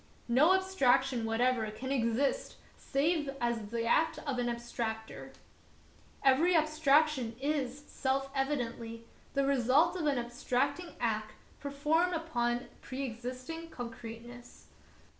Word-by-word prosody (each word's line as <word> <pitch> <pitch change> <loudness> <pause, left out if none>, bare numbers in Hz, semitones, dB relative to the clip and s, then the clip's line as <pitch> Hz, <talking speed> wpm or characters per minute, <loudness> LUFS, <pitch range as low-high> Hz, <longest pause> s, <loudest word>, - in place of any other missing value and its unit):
No 290 +10 +5
abstraction 270 -10 +2
whatever 225 0 +1
can 255 +5 -5
exist 270 - 0 0.2
save 295 +1 0
as 235 -3 -1
the 230 0 -2
act 315 +7 +3
'of 270 -4 -1
an 240 0 0
abstractor. 235 -2 -4 0.9
Every 295 +7 +5
abstraction 305 -5 +3
is, 280 -1 -1
self 270 -1 -1
evidently, 235 -5 -2 0.3
the 275 0 +3
result 275 +6 +3
of 335 -4 -1
an 280 -3 +2
abstracting 250 +7 -1
act 215 -2 -1 0.3
performed 305 +5 +1
upon 240 -8 0
a - - -14
preexistent 255 +5 -5
concreteness. 240 -1 -9
260 Hz, 110 wpm, -32 LUFS, 235-300 Hz, 0.9 s, No